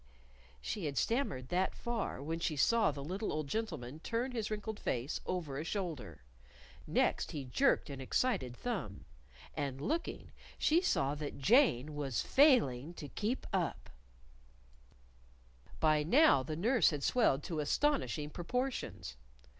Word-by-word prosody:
She 185 - -3
had 140 -2 -3
stammered 185 - 0
that 185 +2 0
far 235 - -3
when 165 +3 -3
she 165 -2 -1
saw 220 +9 +4
the 140 -2 -5
little 190 +8 -3
old 155 -1 -2
gentleman 155 - -4
turn 235 +8 -2
his 225 -4 -3
wrinkled 215 0 -4
face 125 +5 -2
over 155 -7 -3
a - - -3
shoulder. 150 - -4 0.6
Next, - - +1
he 145 -3 -4
jerked 265 - +2
an 140 -2 -7
excited 130 - 0
thumb. 175 - -4 0.5
And 140 -3 -3
looking, 320 - -3 0.3
she 330 +3 +3
saw 140 - +1
that 150 -1 -5
Jane 155 - +4
was 140 -5 -2
failing 175 - +4
to 145 - -8
keep 220 - -2
up. 180 -5 -2 1.9
By 155 -1 +4
now 250 - +5
the 155 +4 -4
nurse 230 +9 +3
had 145 -4 -4
swelled 150 - +3
to 165 -4 -3
astonishing 150 - 0
proportions. 245 - -3
165 Hz, 140 wpm, -34 LUFS, 140-230 Hz, 1.9 s, now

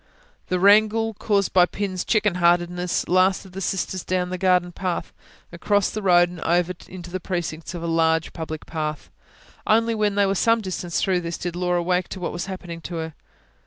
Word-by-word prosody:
The 185 - 0
wrangle 215 +3 +4
caused 200 -1 0
by 180 -1 +6
Pin's 190 -2 -3
chicken 210 -3 +2
heartedness 175 +1 +1
lasted 185 +1 +2
the 190 +2 -7
sisters 190 -1 -2
down 180 -1 -1
the 185 - -2
garden 180 -1 +2
path, 180 0 -3 0.4
across 200 +4 +1
the 215 - -4
road, 175 -2 +5
and 175 -1 -10
over 175 +1 +1
into 180 -1 -9
the 185 - -3
precincts 170 -1 -4
of 170 - -6
a - - -3
large, 165 -1 +1
public 160 -2 -6
park. 155 -2 -3 0.7
Only 230 +1 +3
when 210 -2 0
they 205 0 +3
were 195 - +1
some 230 +4 +3
distance 185 -4 -3
through 185 -2 +1
this, 170 -1 -4
did 175 -1 -4
Laura 180 -1 0
wake 180 +1 0
to 190 - -7
what 180 - -3
was 175 +2 -4
happening 175 -3 -7
to 170 - -6
her. 160 -1 -4
180 Hz, 195 wpm, -23 LUFS, 175-195 Hz, 0.7 s, by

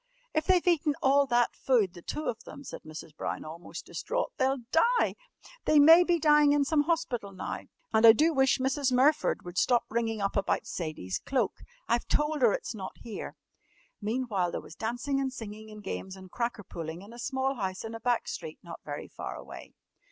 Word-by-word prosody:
"If 310 0 0
they've 370 -2 +4
eaten 310 -4 +3
all 275 +1 +4
that 240 -1 +2
food 220 -9 +2
the 175 - -11
two 300 - -4
of 230 -3 -3
them," 280 +1 -10
said - - -8
Mrs. 155 0 -10
Brown - - -4
almost 165 +3 -8
distraught, - - -3
"they'll 265 -1 +1
die! 475 +9 +3 0.5
They 305 - +4
may 325 +4 +9
be 350 -1 +2
dying 295 -2 +5
in 290 -1 +3
some 295 0 +2
hospital 270 -11 -1
now! 185 - -5 0.3
And 220 0 +4
I 230 - +11
do 310 +9 +3
wish 265 -2 +3
Mrs. 265 +1 0
Murford 270 +5 +3
would 175 +1 -2
stop 245 -1 +3
ringing 225 -1 -1
up 200 0 -1
about 200 - 0
Sadie's 155 - -4
cloak. 270 -2 -1 0.3
I've 235 - +1
told 300 -1 +1
her 235 -4 +6
it's 230 - -3
not 190 -4 -7
here!" 225 -3 -7 0.7
Meantime 215 -4 -1
there - - -3
was - - -12
dancing, 245 +7 -2
and 265 -1 -1
singing, 220 -3 -8
and 215 -1 -11
games, 190 0 -5
and 190 -1 -13
cracker 235 -3 -2
pulling 165 0 -7
in 210 +3 -12
a 240 - -11
small 265 +1 -1
house 190 -6 -4
in 225 0 -6
a 225 - -6
back 240 0 0
street 160 -2 -6
not 170 -1 -9
very 145 -1 -6
far - - -7
away. - - -11
240 Hz, 200 wpm, -29 LUFS, 200-285 Hz, 0.7 s, I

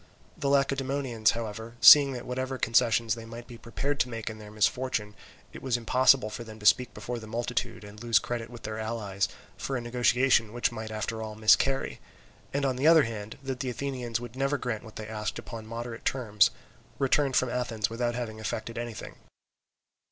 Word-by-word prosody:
The 140 - -2
Lacedaemonians, 135 -4 +1
however, 115 0 -6
seeing 140 -2 +9
that 125 -1 -6
whatever 130 +1 -3
concessions 115 -1 +2
they 115 0 -7
might 115 +1 -9
be 120 -1 -12
prepared 140 +4 -3
to 125 - +1
make 115 -1 -5
in 110 - -10
their 105 -1 -10
misfortune, 105 0 0 0.4
it - - -9
was 130 -3 0
impossible 125 0 +3
for 120 - -6
them 110 -1 -11
to 105 - -12
speak 125 +1 +4
before 120 +3 -5
the 110 - -10
multitude 120 0 -3
and 105 +1 -11
lose 120 -1 +3
credit 120 -2 -2
with 120 -1 -11
their 110 0 -4
allies 105 -3 -2 0.3
for 135 - -3
a - - -4
negotiation 120 -1 +2
which 120 +1 0
might 110 -1 -6
after 110 +1 -4
all 110 -1 -6
miscarry, 135 +5 +3 0.5
and 140 0 0
on 130 -2 0
the 140 +4 +2
other 160 -2 +7
hand, 110 -3 -6
that 135 -1 -4
the 130 - -2
Athenians 125 -3 -3
would 120 0 -9
never 135 +2 0
grant 120 -5 -3
what 110 -2 -13
they 110 - -6
asked 105 -1 -4
upon 110 -1 -8
moderate 115 0 -6
terms, 105 -6 +3 0.5
returned 135 0 +2
from 130 - +3
Athens 115 -4 -1
without 120 0 -1
having 115 -3 -5
effected 110 +2 -4
anything. 120 -2 -7
120 Hz, 190 wpm, -28 LUFS, 110-130 Hz, 0.5 s, seeing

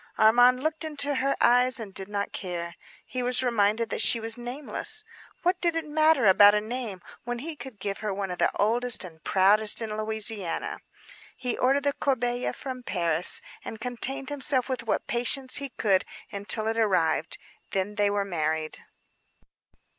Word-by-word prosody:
Armand 245 +4 +5
looked 315 +1 -1
into 290 -2 -2
her 275 +1 0
eyes 250 +1 +4
and 210 -4 -8
did 190 0 -5
not 200 -1 -3
care. 170 -2 -5 0.3
He 255 - -4
was 250 +1 +2
reminded 225 -1 +1
that - - 0
she 230 - +5
was 225 0 -1
nameless. 265 - -1 0.4
What 360 0 +1
did 340 -2 +1
it 325 -1 -2
matter 310 -3 +3
about 205 +1 +7
a - - +3
name 220 -4 -6 0.2
when 245 0 -4
he 310 +6 -6
could 265 -6 -10
give 195 0 -4
her 215 -1 -3
one 195 -1 -4
of 180 - -6
the - - +3
oldest 240 +3 +1
and 160 -3 -12
proudest 205 +3 +3
in 220 -2 -3
Louisiana? 215 -4 -2 0.6
He 250 - -2
ordered 270 +2 +1
the 285 0 +1
corbeille 245 -3 -1
from 260 -2 -7
Paris, 170 -6 +2 0.2
and 220 - -8
contained 250 +3 -4
himself 275 -3 +2
with 260 -2 -3
what - - -1
patience 255 +2 0
he 280 -1 -5
could 195 -6 +1 0.3
until 205 +2 -2
it 225 +1 -1
arrived; 170 -7 +1 0.3
then 195 +2 -2
they 205 -1 +1
were 200 0 -1
married. 155 -3 -2
230 Hz, 170 wpm, -26 LUFS, 200-260 Hz, 0.6 s, about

